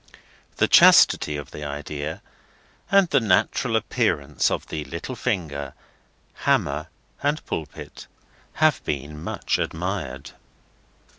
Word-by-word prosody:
The - - +2
chastity 75 -1 +6
of 75 - -8
the 75 - -8
idea, 75 +1 -5 0.7
and 195 -2 +5
the 135 - +4
natural 100 -6 +1
appearance 75 +1 0
of - - -3
the 75 -1 -5
little 85 - -6
finger, 70 - -3 0.6
hammer, - - 0 0.3
and 145 +2 -1
pulpit, 75 -3 -7 0.5
have - - +2
been 75 +2 -4
much - - -2
admired. 80 -6 -4
75 Hz, 105 wpm, -24 LUFS, 70-95 Hz, 0.7 s, chastity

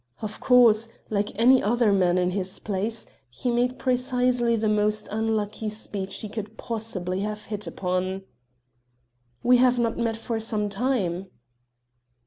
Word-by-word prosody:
Of 215 -1 -6
course 230 -3 +5 0.2
like 205 0 0
any 250 +3 +6
other 230 0 +2
man 180 -2 +3
in 180 0 +1
his 185 -1 -2
place 215 +2 -3 0.2
he 130 - -3
made 245 +1 +1
precisely 250 -2 +1
the 220 -1 0
most 210 0 +1
unlucky 215 0 -1
speech 205 -2 -3
he 215 - -4
could 215 +1 -7
possibly 200 -5 -3
have 210 +1 -4
hit 210 -3 -5
upon: 185 +2 -2 1.2
"We 250 +1 +6
have 250 0 +4
not 235 -1 0
met 230 -1 0
for 225 0 -3
some 215 -2 -1
time." 195 -7 -1
215 Hz, 140 wpm, -25 LUFS, 200-235 Hz, 1.2 s, any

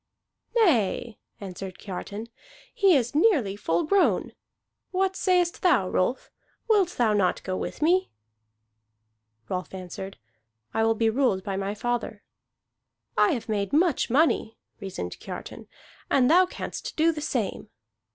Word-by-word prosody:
"Nay," 240 - +2 0.2
answered 190 -1 -7
Kiartan, 205 +2 -6 0.5
"he 390 -4 +4
is 245 -3 +1
nearly 295 - +3
full 170 -4 0
grown. 400 +4 +2 0.6
What 380 0 0
sayest 360 -3 +1
thou, 260 - +3
Rolf? 235 +8 -1 0.4
Wilt 400 -6 +2
thou 230 -3 +3
not 195 -3 +1
go 185 - -3
with 300 - -4
me?" 370 +4 +3 1.4
Rolf 185 +1 -4
answered: 190 +1 -7 0.6
"I 225 - +1
will 225 0 +3
be 225 0 +2
ruled 225 -7 +1
by 195 0 -3
my 195 +1 -2
father." 230 -2 -3 0.9
"I 365 - +4
have 235 -4 -4
made 205 -3 -2
much 325 -1 +2
money," 260 -4 +2 0.2
reasoned 180 - -6
Kiartan, - - -8 0.4
"and 265 0 +4
thou 365 +2 +6
canst - - -6
do 325 +1 +4
the 305 -2 -6
same." - - -2
235 Hz, 130 wpm, -26 LUFS, -, 1.4 s, thou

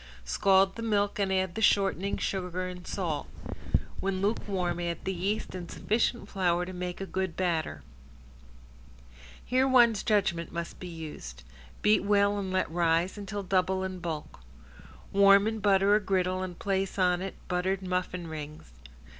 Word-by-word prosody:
Scald 190 - +3
the - - -4
milk 205 -2 0
and 195 -1 +1
add 190 -2 +1
the 220 - -4
shortening, 200 -2 +2
sugar, 185 -1 -2
and 180 0 -8
salt. 165 -7 -2 0.7
When 195 -1 -1
lukewarm 190 -4 -1
add 170 -1 -3
the 190 - -1
yeast 195 +4 -2
and 180 -2 -6
sufficient 230 0 0
flour 180 -3 +1
to 185 - -7
make 180 0 -4
a 195 - -3
good 190 -3 -3
batter. 165 - -1 1.6
Here 260 +2 +2
one's 240 -5 +5
judgment 190 -6 +1
must 170 0 -5
be 180 - -7
used. 150 - -8 0.4
Beat 210 -1 +4
well 200 0 +3
and 190 -2 -3
let 185 -3 0
rise 170 +1 +1
until 205 0 -5
double 190 0 +1
in 185 -1 -4
bulk. 160 - -5 0.7
Warm 200 0 +6
and 220 0 -2
butter 195 0 +4
a 210 - +5
griddle 185 -2 0
and 180 -2 -5
place 195 -1 -1
on 180 -1 +2
it 190 0 -5
buttered 185 +2 -1
muffin 180 -1 -2
rings. 150 - -8
190 Hz, 155 wpm, -29 LUFS, 175-200 Hz, 1.6 s, Warm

